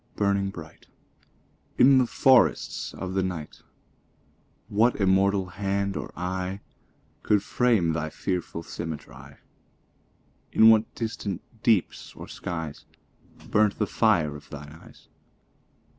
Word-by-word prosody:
burning 100 Hz, -1 st, +1 dB
bright, 85 Hz, -5 st, -11 dB, 0.9 s
In 130 Hz, +1 st, +7 dB
the 125 Hz, -, +2 dB
forests 130 Hz, +2 st, +3 dB
of 95 Hz, -1 st, -5 dB
the 95 Hz, -, +1 dB
night, 90 Hz, -5 st, -5 dB, 1.1 s
What 115 Hz, +4 st, +2 dB
immortal 95 Hz, 0 st, +2 dB
hand 100 Hz, +1 st, -2 dB
or -, -, -5 dB
eye 90 Hz, +2 st, -3 dB, 0.6 s
Could 105 Hz, -2 st, +2 dB
frame 110 Hz, -10 st, +2 dB
thy 80 Hz, -1 st, -2 dB
fearful 85 Hz, -1 st, -4 dB
symmetry? 80 Hz, -3 st, -8 dB, 1.2 s
In 110 Hz, 0 st, +7 dB
what 110 Hz, 0 st, +2 dB
distant 105 Hz, -5 st, -4 dB, 0.2 s
deeps 110 Hz, -7 st, 0 dB
or -, -, -9 dB
skies 80 Hz, -4 st, -6 dB, 0.7 s
Burnt 105 Hz, -1 st, +3 dB
the 105 Hz, -, +1 dB
fire 90 Hz, -8 st, +2 dB
of 75 Hz, -, -12 dB
thine 75 Hz, 0 st, -9 dB
eyes? 80 Hz, -, -16 dB
95 Hz, 115 wpm, -26 LUFS, 85-105 Hz, 1.2 s, In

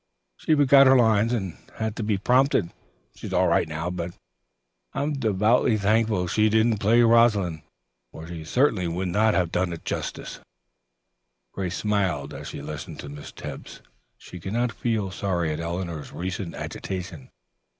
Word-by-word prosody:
She 155 Hz, -, +1 dB
forgot 140 Hz, -1 st, +6 dB
her 130 Hz, 0 st, +7 dB
lines 110 Hz, -1 st, +3 dB
and 95 Hz, -8 st, -2 dB, 0.2 s
had 110 Hz, -1 st, -3 dB
to -, -, -3 dB
be 105 Hz, -2 st, 0 dB
prompted. 125 Hz, -3 st, +2 dB, 0.4 s
She's -, -, -8 dB
all -, -, +3 dB
right -, -, +2 dB
now, 80 Hz, +3 st, -3 dB
but 85 Hz, -1 st, -5 dB, 0.8 s
I -, -, -1 dB
am 150 Hz, +1 st, -1 dB
devoutly 110 Hz, -2 st, +2 dB
thankful 110 Hz, -2 st, +1 dB
she 105 Hz, +5 st, +2 dB
didn't 110 Hz, 0 st, +2 dB
play 115 Hz, +4 st, +4 dB
'Rosalind,' 110 Hz, -8 st, +3 dB, 0.5 s
for 80 Hz, -, -9 dB
she 85 Hz, -2 st, -7 dB
certainly 105 Hz, -, +1 dB
would 90 Hz, +2 st, -2 dB
not 105 Hz, +4 st, +2 dB
have 90 Hz, -3 st, +1 dB
done 90 Hz, -1 st, -1 dB
justice -, -, -4 dB
to -, -, -21 dB
it." -, -, -28 dB, 1.1 s
Grace 95 Hz, -1 st, -3 dB
smiled 95 Hz, -9 st, -1 dB
grimly -, -, -8 dB
as -, -, -8 dB
she 70 Hz, -, -7 dB
listened 75 Hz, 0 st, -7 dB
to 70 Hz, -, -8 dB
Miss 75 Hz, 0 st, -9 dB
Tebbs. -, -, -9 dB, 0.4 s
She 90 Hz, -, -11 dB
could 95 Hz, +4 st, -6 dB
not 120 Hz, +1 st, +1 dB
feel 110 Hz, -4 st, -2 dB
sorry 90 Hz, -5 st, -1 dB
at 75 Hz, -, -5 dB
Eleanor's 85 Hz, -2 st, -4 dB
recent 90 Hz, 0 st, -5 dB
agitation. 90 Hz, -7 st, -6 dB
100 Hz, 170 wpm, -25 LUFS, 85-115 Hz, 1.1 s, her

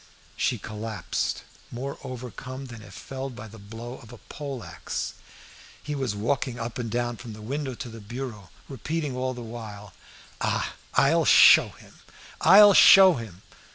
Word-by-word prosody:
She 130 Hz, -2 st, 0 dB
collapsed, 110 Hz, +1 st, -4 dB, 0.3 s
more 135 Hz, +3 st, -6 dB
overcome 130 Hz, +1 st, -8 dB
than 120 Hz, -3 st, -10 dB
if 105 Hz, -1 st, -13 dB
felled 135 Hz, -1 st, -7 dB
by 110 Hz, -, -9 dB
the 110 Hz, +1 st, -13 dB
blow 115 Hz, +5 st, -9 dB
of 115 Hz, -, -15 dB
a 120 Hz, -, -11 dB
pole 140 Hz, -1 st, -8 dB
axe. 85 Hz, -2 st, -5 dB, 0.7 s
He 150 Hz, -, -4 dB
was 130 Hz, -7 st, -2 dB
walking 120 Hz, +3 st, -2 dB
up 115 Hz, +1 st, -5 dB
and 115 Hz, -2 st, -3 dB
down 120 Hz, +1 st, -2 dB
from 115 Hz, -1 st, -9 dB
the 105 Hz, -, -11 dB
window 135 Hz, +2 st, -4 dB
to 120 Hz, -, -7 dB
the 115 Hz, -1 st, -10 dB
bureau, 110 Hz, -2 st, -7 dB, 0.2 s
repeating 145 Hz, +2 st, -4 dB
all 130 Hz, 0 st, -2 dB
the 120 Hz, -, -8 dB
while 105 Hz, -4 st, -9 dB, 0.5 s
"Ah! -, -, -1 dB, 0.2 s
I'll -, -, +4 dB
show -, -, +7 dB
him! -, -, -18 dB, 0.4 s
I'll 205 Hz, +1 st, +8 dB
show 190 Hz, 0 st, +8 dB
him!" 110 Hz, -, -8 dB
120 Hz, 160 wpm, -26 LUFS, 110-135 Hz, 0.7 s, I'll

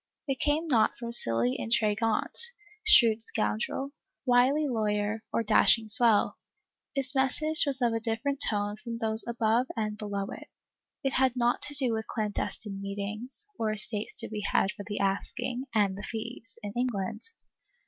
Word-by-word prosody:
It 270 Hz, -2 st, -2 dB
came 305 Hz, +3 st, +1 dB
not 235 Hz, -7 st, +2 dB
from 235 Hz, -1 st, -6 dB
silly 115 Hz, -, +3 dB
intriguante, 225 Hz, -, +1 dB, 0.3 s
shrewd 230 Hz, -, +6 dB
scoundrel, 110 Hz, -, -2 dB, 0.3 s
wily 260 Hz, +4 st, +3 dB
lawyer 215 Hz, -2 st, -1 dB
or 230 Hz, -, 0 dB
dash 215 Hz, +2 st, +5 dB
ing 220 Hz, -1 st, -11 dB
swell. 225 Hz, -1 st, +3 dB, 0.6 s
Its 270 Hz, -1 st, -2 dB
message 295 Hz, +4 st, +4 dB
was 270 Hz, -2 st, 0 dB
of 235 Hz, -1 st, +2 dB
a 225 Hz, -, -1 dB
different 235 Hz, +5 st, -3 dB
tone 205 Hz, -1 st, +2 dB
from 230 Hz, +1 st, -7 dB
those 220 Hz, -1 st, +2 dB
above 235 Hz, +1 st, +1 dB
and 215 Hz, -1 st, -3 dB
below 200 Hz, -2 st, -3 dB
it. -, -, -10 dB, 0.6 s
It 270 Hz, -, -1 dB
had 260 Hz, -1 st, +2 dB
naught 240 Hz, -1 st, +1 dB
to 290 Hz, -, 0 dB
do 260 Hz, -5 st, +1 dB
with 220 Hz, 0 st, -4 dB
clandestine 210 Hz, -2 st, -4 dB
meetings, 205 Hz, -, +1 dB
or 220 Hz, -1 st, 0 dB
estates 210 Hz, 0 st, -3 dB
to -, -, -5 dB
be 215 Hz, -1 st, -5 dB
had 195 Hz, 0 st, +1 dB
for 205 Hz, -, -9 dB
the 205 Hz, -, -4 dB
asking 205 Hz, +6 st, -2 dB
(and 200 Hz, -3 st, +2 dB
the 200 Hz, -, -8 dB
fees), 225 Hz, 0 st, -7 dB
in 205 Hz, -1 st, -6 dB
England. 240 Hz, -, -3 dB
225 Hz, 160 wpm, -28 LUFS, 210-255 Hz, 0.6 s, shrewd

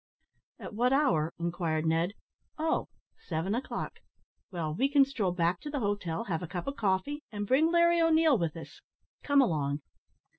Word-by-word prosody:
"At -, -, -9 dB
what 245 Hz, +4 st, +2 dB
hour?" 170 Hz, -, +2 dB
inquired 170 Hz, -2 st, -1 dB
Ned 165 Hz, +4 st, +1 dB, 0.4 s
"oh! 315 Hz, +1 st, 0 dB, 0.3 s
seven 165 Hz, +4 st, -2 dB
o'clock; 245 Hz, +4 st, -4 dB, 0.5 s
well, 165 Hz, -5 st, -3 dB
we 265 Hz, -, +1 dB
can 280 Hz, -1 st, +5 dB
stroll 230 Hz, -9 st, -1 dB
back 175 Hz, 0 st, 0 dB
to 295 Hz, -, -6 dB
the 290 Hz, -, -3 dB
hotel, 200 Hz, -5 st, -2 dB
have 170 Hz, -8 st, -3 dB
a 175 Hz, -, -5 dB
cup 175 Hz, +1 st, -5 dB
of 275 Hz, -, -3 dB
coffee, 210 Hz, +9 st, -1 dB
and 205 Hz, -1 st, -3 dB
bring 295 Hz, +9 st, +3 dB
Larry 340 Hz, 0 st, +4 dB
O'Neil 320 Hz, -2 st, +4 dB
with 170 Hz, -6 st, -1 dB
us. 165 Hz, -, -11 dB, 0.4 s
Come 285 Hz, -1 st, +4 dB
along." 145 Hz, -, -1 dB
200 Hz, 170 wpm, -30 LUFS, 165-280 Hz, 0.5 s, can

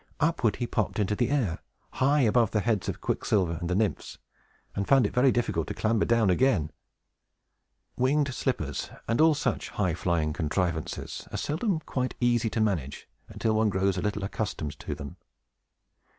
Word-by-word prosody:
upward 150 Hz, -9 st, +2 dB
he 120 Hz, -, -2 dB
popped 110 Hz, -3 st, -1 dB
into 105 Hz, -1 st, +1 dB
the 120 Hz, +3 st, 0 dB
air, 120 Hz, -, 0 dB, 0.3 s
high 140 Hz, +3 st, +2 dB
above 115 Hz, -2 st, +3 dB
the 105 Hz, -, 0 dB
heads 110 Hz, -2 st, 0 dB
of -, -, -5 dB
Quicksilver 85 Hz, -5 st, 0 dB
and 85 Hz, -, -3 dB
the 90 Hz, -, +1 dB
Nymphs, 105 Hz, +1 st, -1 dB, 0.6 s
and 100 Hz, -, -2 dB
found 135 Hz, -4 st, +5 dB
it -, -, -2 dB
very 130 Hz, +1 st, +4 dB
difficult 100 Hz, -10 st, 0 dB
to -, -, -4 dB
clamber 110 Hz, -1 st, +1 dB
down 115 Hz, -4 st, +3 dB
again. 95 Hz, -, +2 dB, 1.2 s
Winged 140 Hz, +2 st, +1 dB
slippers, 80 Hz, -, -2 dB, 0.2 s
and 115 Hz, +5 st, +2 dB
all 160 Hz, -1 st, +6 dB
such 130 Hz, -4 st, -2 dB
high 95 Hz, -5 st, 0 dB
flying 80 Hz, -3 st, 0 dB
contrivances, 80 Hz, 0 st, -2 dB
are -, -, -3 dB
seldom 160 Hz, +3 st, -1 dB
quite 130 Hz, -4 st, -3 dB
easy 120 Hz, -2 st, +2 dB
to 110 Hz, -, -2 dB
manage 85 Hz, -11 st, -1 dB, 0.2 s
until 110 Hz, -, -1 dB
one 110 Hz, 0 st, +3 dB
grows 95 Hz, 0 st, +1 dB
a 90 Hz, -, -2 dB
little 105 Hz, +1 st, -2 dB
accustomed 80 Hz, -8 st, -4 dB
to -, -, -4 dB
them. 70 Hz, -1 st, -8 dB
110 Hz, 170 wpm, -28 LUFS, 90-125 Hz, 1.2 s, all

